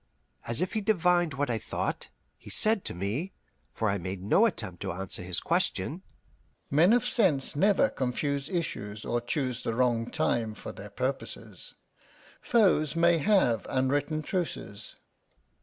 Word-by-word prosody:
As 120 +7 +1
if 185 - -4
he 220 - 0
divined 175 -6 +2
what 140 -2 -1
I 115 - -1
thought, - - -3 0.3
he - - -13
said 215 -2 +4
to - - -3
me 110 - -3 0.4
for 110 - -2
I 100 0 0
made 95 +1 -5
no 195 - +4
attempt 110 - -6
to - - -2
answer 95 0 -2
his 90 -1 +2
question: 150 - 0 0.7
"Men 160 +8 +5
of 245 0 +3
sense 190 - +1
never 200 - +4
confuse 140 - -2
issues 110 - -4
or 120 - -1
choose 125 0 -2
the 115 - -2
wrong 120 -2 +1
time 110 -2 -1
for - - -8
their 100 +1 -10
purposes. 130 +6 -5 0.7
Foes 180 - +3
may 170 0 +4
have 150 - +2
unwritten 145 +4 0
truces." 160 - -4
140 Hz, 150 wpm, -28 LUFS, 110-175 Hz, 0.7 s, Men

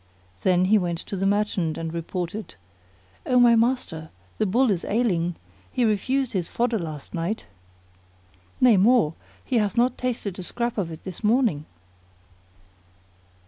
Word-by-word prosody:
Then 180 -1 +3
he 210 +3 +4
went 175 -2 -2
to 195 - -6
the 195 +1 0
merchant 195 -6 0
and 165 0 -4
reported, 175 +5 -4 0.7
"O 250 -1 +3
my 240 -1 +6
master, 225 -10 0 0.3
the 215 - +2
Bull 240 +5 +3
is 180 -4 -1
ailing; 180 -7 0 0.4
he 245 - +1
refused 250 +5 0
his 180 -4 -1
fodder 235 -2 0
last 155 -4 -7
night; 175 +6 -3 1.1
nay 240 -5 +6
more, 210 -5 +4 0.3
he 255 - 0
hath 210 0 0
not 245 +1 +2
tasted 230 -7 -3
a - - -3
scrap 235 +5 -2
of 180 -4 -2
it 160 - -9
this 185 +1 -8
morning." 210 - +2
205 Hz, 145 wpm, -24 LUFS, 175-235 Hz, 1.1 s, my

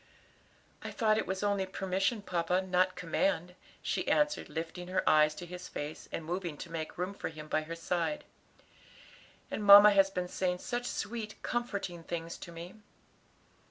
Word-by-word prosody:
"I - - -4
thought 215 -2 +2
it - - -2
was 190 +1 -2
only 200 -2 +1
permission, 195 +3 -1
papa, 180 -1 +1
not 185 0 +2
command," 180 0 0 0.3
she - - -1
answered, 295 0 +2
lifting 165 +3 -5
her 185 +1 -1
eyes 155 0 +5
to 175 - -7
his 180 +1 -8
face, 145 +1 -6
and 165 - -4
moving 175 -2 -3
to 170 - -8
make 160 -1 -5
room 180 +3 -2
for - - -4
him 155 -1 -9
by 155 - +1
her 165 +2 -6
side. 175 - -1 1.3
"And 215 - -3
mamma 205 +1 +10
has 195 -1 +5
been 180 -2 -3
saying 180 0 -1
such 240 +6 -3
sweet, 215 -1 -4
comforting 200 -8 -3
things 165 0 -5
to 170 - -9
me." 170 +2 -8
180 Hz, 165 wpm, -32 LUFS, 165-200 Hz, 1.3 s, mamma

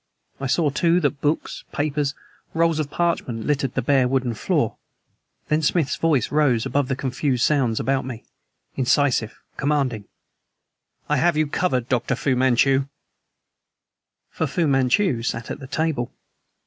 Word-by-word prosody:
I 135 - -2
saw 150 +2 +2
too 170 +4 +2
that 145 -2 -1
books, 150 +2 -1
papers 145 -1 -1 0.4
and 160 - -6
rolls 165 -1 +3
of 150 -2 -2
parchment 145 -9 -1
littered 140 -3 0
the 135 - 0
bare 135 -1 +3
wooden 130 -2 0
floor. 110 - 0 0.7
Then 150 +1 +1
Smith's 155 -1 +1
voice 155 -7 +1
rose 135 -7 +2
above 140 -2 0
the 130 - -1
confused 130 -1 -1
sounds 130 -7 +1
about 135 0 0
me, 125 -3 -7 0.5
incisive, 130 -3 +1 0.2
commanding: 135 -7 0 1.0
"I - - +1
have 170 -2 +2
you 155 - +3
covered, 135 -5 -1
Dr. 125 -4 0
Fu 135 -3 0
Manchu!" 130 +2 +3 1.4
For 160 - -1
Fu 170 +5 0
Manchu 135 - +2
sat 115 -1 -3
at - - -5
the 135 - -9
table. 140 -3 -1
140 Hz, 150 wpm, -23 LUFS, 125-150 Hz, 1.4 s, rolls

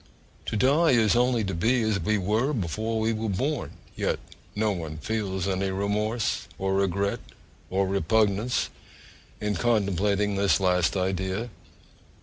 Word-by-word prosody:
To 110 - -1
die 140 +6 +4
is 115 -2 +4
only 120 -1 +2
to 95 -1 -2
be 115 +8 +2
as 110 -2 +1
we 105 +5 +1
were 110 +9 +1
before 110 - -2
we 110 +1 +1
were 110 0 -2
born; 130 +9 -2 0.2
yet - - 0 0.4
no 110 0 +1
one 80 -5 -5
feels 95 +1 -2
any 95 0 0
remorse, 105 +4 -1
or 95 0 -1
regret, 100 +1 0 0.5
or 95 +1 +1
repugnance, 100 +5 +1 0.7
in 105 0 -1
contemplating 105 -2 +1
this 100 0 +3
last 90 -1 +2
idea. 95 +4 -2
105 Hz, 135 wpm, -26 LUFS, 95-110 Hz, 0.7 s, die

